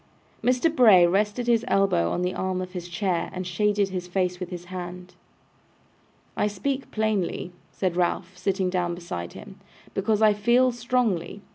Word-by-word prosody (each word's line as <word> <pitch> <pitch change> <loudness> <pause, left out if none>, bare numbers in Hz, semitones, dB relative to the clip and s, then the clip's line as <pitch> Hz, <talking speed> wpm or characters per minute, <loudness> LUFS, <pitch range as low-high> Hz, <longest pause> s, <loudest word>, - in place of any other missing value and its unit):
Mr. 255 +6 +2
Bray 210 - +7
rested 205 +6 +1
his 235 -1 +3
elbow 195 - +2
on 180 - -1
the 180 +1 -1
arm 185 -1 -2
of 185 0 -5
his 175 -1 -6
chair, 180 -1 -1
and 185 0 -4
shaded 200 +2 +1
his 180 -2 -4
face 180 -1 -1
with 180 -2 -5
his 175 -1 -7
hand. 180 0 -7 1.2
'I - - +1
speak 260 +7 -3
plainly,' 215 -5 -1 0.2
said 185 -3 -2
Ralph, 180 +1 -1
sitting 185 0 -1
down 175 -2 -1
beside 90 - -6
him, - - -11 0.3
'because 210 +2 +1
I 215 -1 +6
feel 240 +5 +3
strongly. 235 -6 -1
190 Hz, 160 wpm, -25 LUFS, 180-215 Hz, 1.2 s, Bray